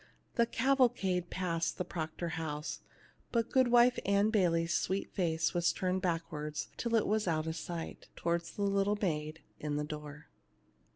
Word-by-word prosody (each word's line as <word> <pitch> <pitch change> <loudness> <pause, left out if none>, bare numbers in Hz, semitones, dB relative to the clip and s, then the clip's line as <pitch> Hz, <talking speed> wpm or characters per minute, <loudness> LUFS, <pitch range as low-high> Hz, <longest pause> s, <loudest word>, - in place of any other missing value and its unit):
The 235 -1 +3
cavalcade 235 -10 +2
passed 170 -3 -1
the 180 - -2
Proctor 165 +1 -4
house, 155 -2 -4 0.5
but 230 -1 0
Goodwife 245 -1 +5
Ann 200 +2 +3
Bayley's 170 -5 +2
sweet 190 +1 -1
face 160 -4 0
was 175 -1 +3
turned 185 0 -1
backward 155 -4 -2
until 235 -1 -1
it 225 - +3
was 215 -1 +1
out 155 -2 +1
of 160 0 -2
sight, 165 0 -6
towards 170 0 -1
the 205 - -2
little 200 +1 +2
maid 155 -4 -2 0.2
in 150 -1 -2
the 150 - 0
door. 150 0 -7
175 Hz, 155 wpm, -33 LUFS, 160-205 Hz, 0.5 s, Goodwife